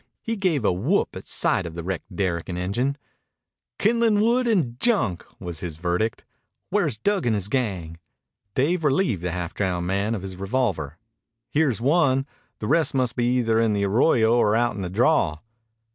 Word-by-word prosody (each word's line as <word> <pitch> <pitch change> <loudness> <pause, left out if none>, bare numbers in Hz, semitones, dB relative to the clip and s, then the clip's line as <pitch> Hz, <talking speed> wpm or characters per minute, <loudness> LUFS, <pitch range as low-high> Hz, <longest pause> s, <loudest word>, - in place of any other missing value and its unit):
He 230 - -2
gave 175 - 0
a - - +4
whoop 135 - 0
at - - -9
sight - - +2
of 80 - -9
the 85 - -5
wrecked 95 +2 -5
derrick 85 -3 -1
and 90 - -3
engine. 120 +10 -1 0.8
"Kindlin' 225 -1 +3
wood 240 +3 +2
and 150 - +1
junk," 195 - +1 0.2
was 85 -4 -6
his 80 -3 -6
verdict. 90 +6 -1 0.5
"Where's 170 - +1
Dug 195 - 0
and 110 - +2
his 100 -2 -1
gang?" 95 -11 -2 0.6
Dave 165 +6 +1
relieved 140 - +1
the 90 0 -2
half 90 0 -4
drowned 90 -3 -1
man 100 +5 0
of 100 - -6
his 95 -1 -7
revolver. 95 - -1 0.5
"Here's 140 -7 +1
one. 135 -1 +3 0.3
The - - -6
rest 160 -4 +2
must 125 -3 +1
be 120 - 0
either 120 -2 +2
in 115 -2 +2
the 100 -1 +1
arroyo 115 +2 +3
or 110 -3 +3
out 120 -1 +1
in 100 - -5
the 90 - -3
draw." 100 - +2
115 Hz, 180 wpm, -24 LUFS, 90-145 Hz, 0.8 s, a